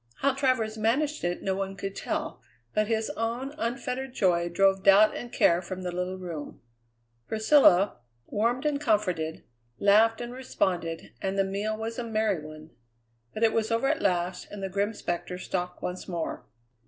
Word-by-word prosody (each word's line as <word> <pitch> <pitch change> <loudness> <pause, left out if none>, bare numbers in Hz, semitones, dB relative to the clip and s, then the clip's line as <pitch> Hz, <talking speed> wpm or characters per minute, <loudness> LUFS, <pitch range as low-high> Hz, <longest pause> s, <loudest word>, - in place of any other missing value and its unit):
How 275 0 +1
Travers 255 -5 0
managed 280 +8 +1
it 175 0 -2
no 190 - 0
one 195 0 -3
could 195 0 -5
tell, - - -3 0.3
but 215 0 +1
his 220 -1 0
own 235 +5 -3
unfettered 250 +2 -3
joy 175 -2 +2
drove 195 +2 +3
doubt 200 +2 +6
and 240 - -6
care 170 +1 +4
from 185 +1 -6
the 180 - -2
little 180 +1 -3
room. 170 -5 -7 0.7
Priscilla, 215 - +5 0.3
warmed 235 - 0
and 290 -1 0
comforted, 185 - 0 0.3
laughed 220 +3 +4
and 240 0 -5
responded, 175 -10 -2
and 195 0 -2
the 195 - +4
meal 205 +3 -2
was 225 +2 -4
a - - -2
merry 215 -7 0
one. 155 +1 -11 0.6
But 215 - -1
it 225 - +4
was 220 -1 +1
over 230 +3 +1
at 310 +1 0
last, 180 -1 0
and 205 -1 -7
the 195 - -2
grim 200 +3 0
spectre 175 +1 -3
stalked 180 -1 -4
once 180 +1 -4
more. 170 -3 -4
205 Hz, 170 wpm, -28 LUFS, 180-230 Hz, 0.7 s, doubt